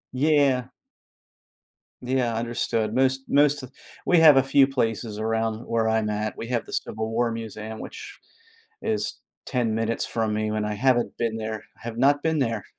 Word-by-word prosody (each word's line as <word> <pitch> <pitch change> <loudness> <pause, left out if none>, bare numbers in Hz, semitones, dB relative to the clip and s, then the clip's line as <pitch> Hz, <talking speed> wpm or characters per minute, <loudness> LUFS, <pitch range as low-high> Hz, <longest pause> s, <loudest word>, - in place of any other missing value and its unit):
Yeah. 140 -3 +3 1.3
Yeah, 125 -2 0
understood, 115 -1 -1
most 130 +1 +2
most 145 0 +4
th 130 0 -10 0.3
we 175 - +4
have 155 -3 +8
a 135 - +5
few 135 0 +4
places 115 -4 -2
around 110 0 -1
where 115 -1 0
I'm 110 -1 +1
at. 105 0 -2
We 115 - -5
have 120 -2 -1
this - - -2
civil 110 +1 -4
war 115 0 +1
museum, 110 -1 -6
which - - -9 0.6
is 220 -1 -2 0.2
10 120 -4 -1
minutes 115 +1 -1
from 110 -2 -1
me 110 0 -1
when 110 0 -1
I 105 0 -2
haven't 125 +1 +1
been 115 -1 -1
there, 110 -1 -5
I - - -25
have 115 0 -6
not 145 +2 +3
been 160 -1 +1
there. 115 -6 -1
115 Hz, 175 wpm, -25 LUFS, 110-135 Hz, 1.3 s, have